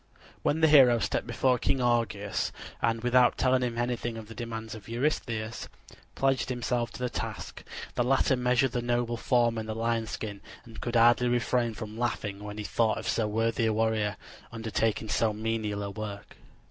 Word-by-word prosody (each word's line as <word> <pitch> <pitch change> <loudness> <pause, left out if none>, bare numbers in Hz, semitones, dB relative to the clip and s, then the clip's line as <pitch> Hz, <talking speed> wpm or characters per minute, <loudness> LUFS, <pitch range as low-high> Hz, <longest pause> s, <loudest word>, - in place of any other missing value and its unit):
When 160 +2 +1
the 160 - +6
hero 135 -6 +7
stepped 115 - -1
before 125 +1 +2
King 135 - +1
Augeas 115 -5 0 0.3
and 115 0 0
without 125 0 +4
telling 130 0 +3
him 120 -2 -2
anything 120 -1 -2
of 110 -1 -8
the 115 - -9
demands 115 -1 -6
of 110 -1 -10
Eurystheus, 115 -3 -2 0.5
pledged 135 -1 +1
himself 120 -1 -1
to - - -9
the 125 - 0
task, 120 - -5 0.3
the - - 0
latter 135 +1 +3
measured 125 0 +2
the 120 - -1
noble 120 0 0
form 120 -1 +2
in 110 - -5
the 110 - -3
lion 115 0 0
skin 105 -2 -5 0.2
and 115 -2 -11
could 120 0 -3
hardly 120 +1 +5
refrain 120 -1 +1
from 110 +1 -7
laughing 105 -4 -2
when 105 0 -7
he 105 - -4
thought 110 0 +1
of - - -5
so 110 -2 +1
worthy 115 +1 +1
a 110 - +2
warrior 110 -2 0 0.3
undertaking 110 -1 -1
so 110 0 +1
menial 110 -1 -2
a 100 - -4
work. 100 -1 -7
115 Hz, 185 wpm, -28 LUFS, 110-120 Hz, 0.5 s, hero